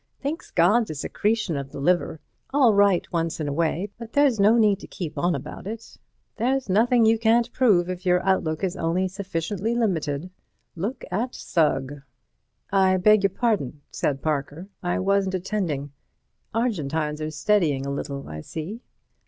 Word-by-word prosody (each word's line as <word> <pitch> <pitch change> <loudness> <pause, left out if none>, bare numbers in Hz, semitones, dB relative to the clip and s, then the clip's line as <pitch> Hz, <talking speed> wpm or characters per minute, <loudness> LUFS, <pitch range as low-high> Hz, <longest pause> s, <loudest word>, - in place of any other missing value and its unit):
Thinks 290 +4 -4
God's 210 +7 +3
a 155 - -4
secretion 210 +5 -1
of 140 -1 -5
the - - -7
liver—all 180 - +1
right 200 -3 +4
once 165 -1 -1
in 155 - -2
a 145 - -2
way, 170 +5 -1
but 230 -1 -9
there's 280 -6 +3
no 210 +4 +5
need 210 -3 +3
to - - -10
keep 170 -5 -6
on 175 0 +1
about - - -7
it. 225 +2 -7 0.4
There's 260 +4 0
nothing 230 +4 +4
you 225 0 +4
can't 235 +1 +3
prove 200 -9 +3
if 180 0 -5
your 180 0 +2
outlook 160 -3 +1
is 190 -1 -1
only 175 +3 0
sufficiently 195 +3 -3
limited. 175 -7 -1 0.4
Look 200 +10 -4
at 235 +7 -2
Sugg." 145 -3 0 0.7
"I 190 -1 +4
beg 210 +3 +5
your 195 - +3
pardon," 190 - -1
said 135 -2 -2
Parker, 155 +4 -2
"I 175 -1 -1
wasn't 195 0 +1
attending. 175 -7 -2 0.6
Argentines 160 - -1
are 155 - -2
steadying 155 -4 +1
a 140 - -3
little, 140 0 -5
I 75 0 -7
see." 170 - -6
185 Hz, 160 wpm, -24 LUFS, 155-215 Hz, 0.7 s, no